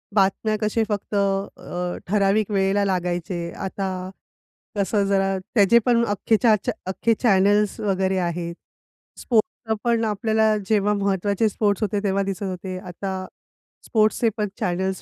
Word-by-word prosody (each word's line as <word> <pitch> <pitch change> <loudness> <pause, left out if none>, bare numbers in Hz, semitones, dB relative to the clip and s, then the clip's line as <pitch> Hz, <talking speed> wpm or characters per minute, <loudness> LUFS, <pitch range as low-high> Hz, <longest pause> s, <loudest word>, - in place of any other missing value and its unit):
बातम्या 205 +2 +2
कसे 215 +1 +1
फक्त 205 0 -3
अ, 195 -3 -2
ठराविक 205 +1 +2
वेळेला 195 +1 +2
लागायचे. 175 -2 -2
आता 195 0 -4 0.9
कसं 200 +1 +1
जरा 195 -1 +1 0.2
त्याचे 210 +3 +6
पण 235 -1 +3
अख्खेच्या 215 +2 +3
च्या - - -1 0.2
अख्खे 230 +4 +1
चॅनल्स 205 -1 +3
वगैरे 190 -2 0
आहेत. 170 -1 -3 0.6
स्पोर्ट्स 225 -1 0
पण 235 -1 +2
आपल्याला 220 +1 +2
जेव्हा 210 -1 +3
महत्त्वाचे 200 +1 +1
स्पोर्ट्स 205 0 0
होते 205 0 0
तेव्हा 195 -1 +1
दिसत 195 +1 -4
होते. 185 0 -4
आता 185 +1 -5 0.6
स्पोर्ट्सचे 220 +1 +2
पण 210 -1 0
चॅनल्स 190 +2 -1
200 Hz, 130 wpm, -23 LUFS, 190-215 Hz, 0.9 s, त्याचे